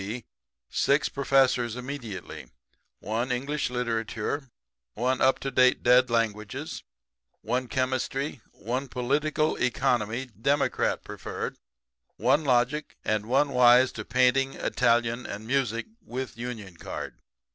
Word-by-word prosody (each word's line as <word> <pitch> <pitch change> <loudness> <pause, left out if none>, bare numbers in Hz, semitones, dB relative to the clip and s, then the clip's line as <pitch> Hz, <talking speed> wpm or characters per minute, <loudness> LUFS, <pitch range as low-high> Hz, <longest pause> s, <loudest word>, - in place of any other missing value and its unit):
b., 110 +4 -5 0.4
six 140 +2 +2
professors 130 -4 +2
immediately 125 -5 -7 0.5
one 115 +5 -2
English 140 +4 -1
literature, 120 +2 -2 0.5
one 125 +3 0
up 130 0 +4
to 135 - -4
date 130 0 +4
dead 125 +1 +5
languages, 110 -3 -2 0.6
one 125 +3 -1
chemistry, 130 +2 -1
one 125 +7 -3
political 150 +5 0
economy 120 -1 0
democrat 130 +5 0
preferred - - -5 0.6
one 155 - +3
logic, 130 +3 +1
and 110 0 0
one 135 +4 +3
wise 125 0 +6
to - - -6
painting, 130 +2 +2
Italian 120 0 +1
and 105 +2 -6
music, 125 -2 0 0.2
with 130 - -5
union 115 -6 -6
card. - - -7
125 Hz, 115 wpm, -27 LUFS, 115-135 Hz, 0.6 s, wise